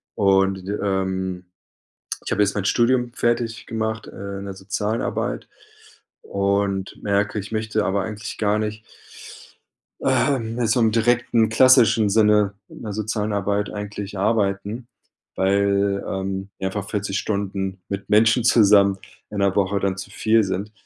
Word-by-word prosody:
Und, 95 -2 +2 0.2
ähm, 95 -2 -2 0.8
ich - - -5
habe 105 - +2
jetzt 100 - +1
mein 100 -2 -2
Studium 120 +2 +2
fertig 120 -1 -1
gemacht, 110 0 -3
äh, 100 0 -7
in 100 - -7
der 100 - -6
sozialen 100 +4 -2
Arbeit - - -3 0.7
und 100 -1 -1
merke, 100 +1 0
ich 100 - -9
möchte 110 -1 -1
aber 100 0 0
eigentlich 105 -1 -6
gar 105 0 +1
nicht 110 0 -4 1.2
ähm 120 -2 +1
so 115 +3 +2
im 110 -2 +3
direkten 115 0 +2
klassischen 115 -3 +5
Sinne 105 -1 +4 0.2
in - - -12
der 105 - -5
sozialen 110 0 -2
Arbeit 100 +1 -1
eigentlich 105 -1 -6
arbeiten, 105 +2 -1 0.5
weil, 100 +1 +1
ähm, 95 0 -4
mir 95 - -3
einfach 95 +1 -4
40 100 -1 -2
Stunden 95 -2 -3
mit 100 0 -5
Menschen 110 +3 +4
zusammen 100 -4 +5 0.3
in 105 - -5
der 100 -1 +2
Woche 100 0 +1
dann 95 -1 -1
zu 100 +1 -8
viel 110 +2 +2
sind. 100 +2 -4
100 Hz, 145 wpm, -22 LUFS, 100-110 Hz, 1.2 s, klassischen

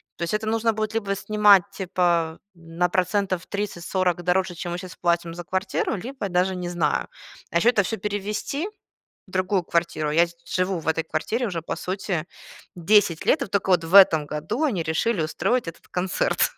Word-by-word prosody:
То - - -15
есть 170 - -2
это 215 +1 -1
нужно 225 +1 +2
будет, 215 0 -3
либо 200 -3 -1
снимать, 205 -2 +5
типа, 175 -4 0 0.2
на 170 +1 -2
процентов 185 0 0
30-40 185 -3 -2
дороже, 180 0 +1
чем 175 +1 -5
мы 175 - -3
щас 180 -1 -9
платим 170 -1 0
за 175 0 -7
квартиру, 185 +5 -1
либо 235 +1 -5
даже 180 +1 +1
не 180 -1 -4
знаю. 170 -4 0 0.4
А 170 - +2
еще 230 +8 +4
это 210 -5 +3
всё 225 +4 -3
перевезти 210 - -3 0.6
в 185 - -18
другую 185 0 0
квартиру, 165 -3 -1
я 170 +3 +4
сд 170 0 -17
живу 185 0 0
в 160 - -11
этой 160 0 +1
квартире 215 +10 -2
уже, 170 -4 -3
по - - -3
сути, 185 -3 -3 0.5
10 180 -1 +3
лет, 295 - +3
и 260 - -2
тока 195 -1 0
вот 175 -2 +4
в 170 +4 -1
этом 160 -6 +7
году 160 - -3
они 205 - 0
решили 165 +5 0
устроить 230 +8 0
этот 165 - -9
концерт. 185 - +1
185 Hz, 190 wpm, -24 LUFS, 170-205 Hz, 0.6 s, этом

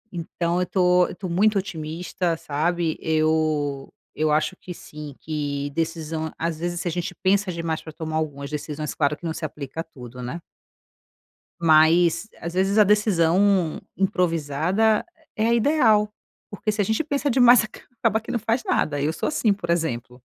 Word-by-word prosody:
Então 170 +1 -2
eu - - +1
tô 180 -1 +3
eu - - -8
tô 185 - -6
muito 200 +5 +2
otimista, 170 -1 -3
sabe? 160 +3 -1
Eu 155 -3 0 0.2
eu 155 0 +1
acho 155 +5 +1
que 180 - -10
sim, 150 -3 -10
que 145 -2 -3
decisão, 160 0 -3
às 165 -1 -2
vezes, 175 +1 -2
se 175 - -4
a - - 0
gente 175 +1 -4
pensa 195 0 +1
demais 165 -2 -3
para 160 - -9
tomar 155 0 -4
algumas 145 -3 -3
decisões, 150 0 -4
claro 150 0 0
que - - -32
não 160 - -1
se 165 - -8
aplica 145 -1 -6
a - - -5
tudo, 125 -6 -11
né. 125 +8 -5 1.2
Mas 165 +3 +4
às 170 +1 -5
vezes 190 +3 +1
a 215 - +8
decisão 195 -3 +3 0.2
improvisada, 180 +2 +1 0.3
eh 215 - 0
é - - +3
a - - +4
ideal. 225 -5 +3 0.4
Porque 215 +1 -2
se 210 0 -1
a - - +1
gente 220 +9 0
pensa 285 -1 -1
demais 245 -1 +7 0.4
acaba 225 -1 +3
que - - -7
não 240 - 0
faz 230 +3 0
nada. 145 -2 0
Eu 150 +2 +1
sou - - -2
assim, 235 -8 +2
por 185 -4 -7
exemplo. 130 -7 -1
170 Hz, 175 wpm, -24 LUFS, 155-195 Hz, 1.2 s, a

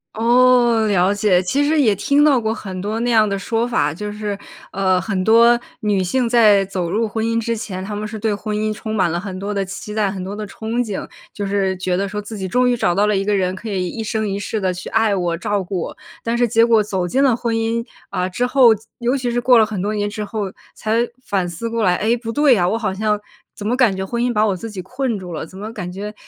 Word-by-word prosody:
哦， 240 -1 +4
了 195 -1 +3
解。 200 -3 +3
其 280 +10 +1
实 310 0 +2
也 215 -7 +4
听 285 +8 +2
到 280 -5 +4
过 220 0 0
很 190 -4 -7
多 215 +3 -2
那 240 0 0
样 215 -2 +4
的 200 0 -1
说 225 +5 -1
法， 150 -11 +1
就 210 +4 -5
是， 210 -1 -4 0.3
呃， 185 -1 +2
很 190 -1 -2
多 235 +2 +5 0.2
女 205 -3 +1
性 245 +6 0
在 215 -5 +5
走 185 -3 -3
入 220 +4 0
婚 220 +1 -3
姻 230 0 +1
之 230 +1 -1
前， 190 -4 -5
她 205 +1 -5
们 210 +1 -4
是 220 +1 -6
对 215 0 0
婚 210 +1 -4
姻 215 0 -1
充 220 +1 -5
满 180 -5 +2
了 170 - -1
很 185 0 -6
多 200 +2 -4
的 200 - 0
期 195 +2 -7
待， 210 -2 +1
很 190 -2 -5
多 195 +2 -5
的 210 0 -5
憧 220 +3 -6
憬， 215 -5 -2 0.3
就 205 - -4
是 195 -1 0
觉 185 -1 -1
得， 200 +2 -1
说： 210 - -4
“自 215 +2 -8
己 190 - -3
终 250 +6 +2
于 245 - +2
找 175 -7 +1
到 205 +1 +3
了 210 -1 +2
一 195 - 0
个 210 0 +1
人， 185 -2 0
可 220 +4 -7
以 185 -3 -1
一 225 - -5
生 220 -1 -2
一 200 0 -2
世 215 +2 -3
地 185 -2 0
去 180 - -7
爱 225 -2 +2
我， 175 -2 -1
照 205 0 -1
顾 185 0 -3
我。” - - -6 0.3
但 230 +1 -1
是 245 - +3
结 230 +1 +4
果 225 -2 +4
走 190 -4 -2
进 270 +10 +1
了 255 -4 +4
婚 235 -1 -2
姻， 225 +1 -1 0.2
啊， 180 0 -1
之 245 +7 -1
后， 255 -1 +6 0.3
尤 245 +3 +1
其 250 -3 -1
是 240 0 0
过 245 -1 +5
了 220 - +5
很 210 -3 -5
多 210 +2 -1
年 205 0 -1
之 210 0 -5
后， 205 -2 -4 0.2
才 230 +2 0 0.2
反 195 -6 -1
思 175 +7 -5
过 230 -1 -1
来：” 180 - +4
哎， 230 +3 +1
不 230 -1 -5
对 290 -1 +4
呀， 175 -3 +2
我 225 - +1
好 210 -4 -2
像 210 +1 0 0.4
怎 205 - -8
么 245 - +1
感 240 -7 +3
觉 190 0 -3
婚 235 +4 -2
姻 245 - +1
把 215 -1 +2
我 195 - 0
自 225 +5 -7
己 200 -3 -6
困 250 +1 -2
住 180 -3 -8
了， 155 - -4
怎 190 +3 -13
么 215 +3 -6
感 180 0 -5
觉， 205 +3 -6
210 Hz, 290 characters per minute, -19 LUFS, 195-230 Hz, 0.4 s, 后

